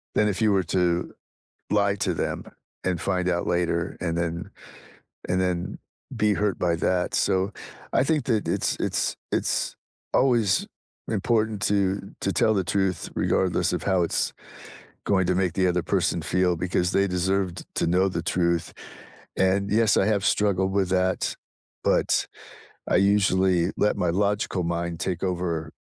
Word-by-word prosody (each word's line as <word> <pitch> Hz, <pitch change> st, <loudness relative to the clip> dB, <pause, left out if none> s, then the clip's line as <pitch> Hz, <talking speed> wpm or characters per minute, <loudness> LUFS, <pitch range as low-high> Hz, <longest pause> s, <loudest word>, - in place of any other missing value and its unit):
than 105 Hz, -, +3 dB
if 105 Hz, +1 st, -2 dB
you 110 Hz, -, +4 dB
were 95 Hz, -2 st, +2 dB
to 90 Hz, 0 st, 0 dB, 0.6 s
lie 100 Hz, -1 st, +2 dB
to 100 Hz, -, -1 dB
them -, -, -3 dB, 0.4 s
and 90 Hz, -2 st, -1 dB
find 90 Hz, -1 st, 0 dB
out 85 Hz, -1 st, 0 dB
later 85 Hz, -1 st, 0 dB
and 85 Hz, -1 st, -1 dB
then 85 Hz, +3 st, -3 dB, 0.8 s
and 90 Hz, +1 st, +1 dB
then 90 Hz, -1 st, -2 dB, 0.4 s
be 105 Hz, -1 st, +2 dB
hurt 105 Hz, -2 st, 0 dB
by 85 Hz, -2 st, +1 dB
that, 90 Hz, +2 st, 0 dB
so, 95 Hz, +1 st, +1 dB, 0.4 s
I -, -, +4 dB
think 150 Hz, -2 st, +1 dB
that 110 Hz, -5 st, 0 dB
it's -, -, 0 dB
it's -, -, 0 dB
it's -, -, 0 dB, 0.4 s
always 115 Hz, -8 st, +3 dB, 0.4 s
important 110 Hz, -1 st, 0 dB
to 100 Hz, -1 st, 0 dB
to -, -, -1 dB
tell 110 Hz, -, +3 dB
the 95 Hz, -3 st, 0 dB
truth 95 Hz, +1 st, -1 dB
regardless -, -, +1 dB
of -, -, -2 dB
how 95 Hz, -2 st, +2 dB
it's 85 Hz, -, 0 dB, 0.7 s
going 95 Hz, -2 st, +2 dB
to 90 Hz, -, +2 dB
make 95 Hz, -2 st, +1 dB
the 95 Hz, -1 st, +2 dB
other 90 Hz, -1 st, 0 dB
person 85 Hz, -, 0 dB
feel 90 Hz, +1 st, +1 dB
because 90 Hz, +1 st, 0 dB
they 100 Hz, 0 st, +2 dB
deserved 95 Hz, 0 st, -1 dB
to -, -, +1 dB
know 90 Hz, +3 st, +3 dB
the 85 Hz, -2 st, -3 dB
truth. 85 Hz, -1 st, 0 dB, 0.6 s
And, 95 Hz, +1 st, +2 dB
yes, 110 Hz, +1 st, +3 dB
I -, -, +3 dB
have 105 Hz, -2 st, +1 dB
struggled 95 Hz, -2 st, +2 dB
with 95 Hz, -2 st, +1 dB
that, 95 Hz, 0 st, +1 dB, 0.5 s
but -, -, +2 dB, 0.6 s
I -, -, +3 dB
usually 95 Hz, -2 st, +3 dB
let 105 Hz, -, +2 dB
my 90 Hz, -, +1 dB
logical 100 Hz, 0 st, 0 dB
mind 85 Hz, 0 st, -2 dB
take 85 Hz, +1 st, -2 dB
over 85 Hz, -4 st, -2 dB
95 Hz, 160 wpm, -25 LUFS, 90-100 Hz, 0.8 s, you